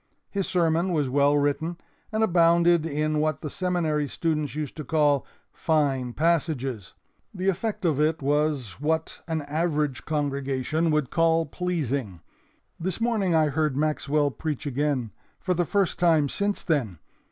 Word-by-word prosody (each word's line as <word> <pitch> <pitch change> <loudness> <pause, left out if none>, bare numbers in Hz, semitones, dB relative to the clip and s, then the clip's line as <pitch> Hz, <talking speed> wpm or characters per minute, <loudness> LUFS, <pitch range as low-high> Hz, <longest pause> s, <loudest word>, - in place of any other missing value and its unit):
His 195 -2 -1
sermon 170 0 +1
was 145 -5 +1
well 140 +2 +3
written 145 +4 0 0.3
and 220 0 +1
abounded 170 -3 +4
in 155 0 0
what 155 -1 0
the 150 - -5
Seminary 165 -5 0
students 155 0 -2
used 150 -3 -4
to 155 - -4
call 145 -1 +2 0.3
'fine 140 -6 0
passages.' 140 - -1 0.4
The 190 +1 0
effect 195 +1 -2
of 155 -4 +2
it 155 +1 +2
was 145 -6 0
what 160 +2 -1
an 160 -2 -2
average 150 -3 -1
congregation 145 +1 -1
would 150 -4 0
call 165 -1 +3
'pleasing.' 140 - -3 0.6
This 180 +3 -3
morning 220 -7 +1
I 155 -1 +4
heard 150 -1 0
Maxwell 150 -1 +1
preach 155 0 -4
again, 140 -4 -1 0.3
for 185 - 0
the 175 0 0
first 195 +1 0
time 160 -5 +3
since 200 +5 -2
then. 130 - 0
155 Hz, 145 wpm, -26 LUFS, 145-170 Hz, 0.6 s, abounded